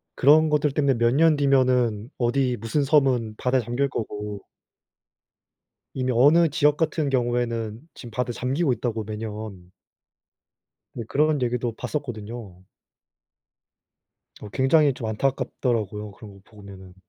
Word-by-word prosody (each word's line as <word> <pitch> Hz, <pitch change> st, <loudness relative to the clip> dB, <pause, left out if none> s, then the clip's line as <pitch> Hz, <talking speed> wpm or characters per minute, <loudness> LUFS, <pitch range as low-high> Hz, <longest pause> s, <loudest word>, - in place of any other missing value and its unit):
그런 155 Hz, +3 st, +5 dB
것들 150 Hz, -1 st, +1 dB
때문에 140 Hz, -1 st, +2 dB
몇 120 Hz, +1 st, +2 dB
년 160 Hz, +2 st, +4 dB
뒤면은 125 Hz, -6 st, +2 dB
어디 125 Hz, +1 st, 0 dB
무슨 115 Hz, +7 st, -1 dB
섬은 130 Hz, -6 st, +2 dB
바다에 125 Hz, 0 st, +1 dB
잠길 120 Hz, +5 st, -1 dB
거고 105 Hz, -3 st, -6 dB, 1.5 s
이미 130 Hz, -1 st, -1 dB
어느 150 Hz, +7 st, +5 dB
지역 150 Hz, 0 st, +2 dB
같은 155 Hz, -2 st, 0 dB
경우에는 120 Hz, -3 st, -1 dB
지금 120 Hz, -3 st, -11 dB
바다에 125 Hz, +2 st, -2 dB
잠기고 135 Hz, +4 st, 0 dB
있다고 115 Hz, -2 st, -3 dB
매년. 105 Hz, -4 st, -7 dB, 1.2 s
네 115 Hz, -, -5 dB
그런 150 Hz, +1 st, +1 dB
얘기도 120 Hz, -1 st, -1 dB
봤었거든요. 115 Hz, -, -6 dB, 1.8 s
어 105 Hz, -, -8 dB
굉장히 140 Hz, +3 st, +3 dB
좀 115 Hz, -, -6 dB
안타깝더라고요 110 Hz, -3 st, -2 dB
그런 105 Hz, 0 st, -13 dB
거 100 Hz, -, -16 dB
보면은. 100 Hz, -3 st, -14 dB
120 Hz, 275 characters per minute, -24 LUFS, 110-140 Hz, 1.8 s, 그런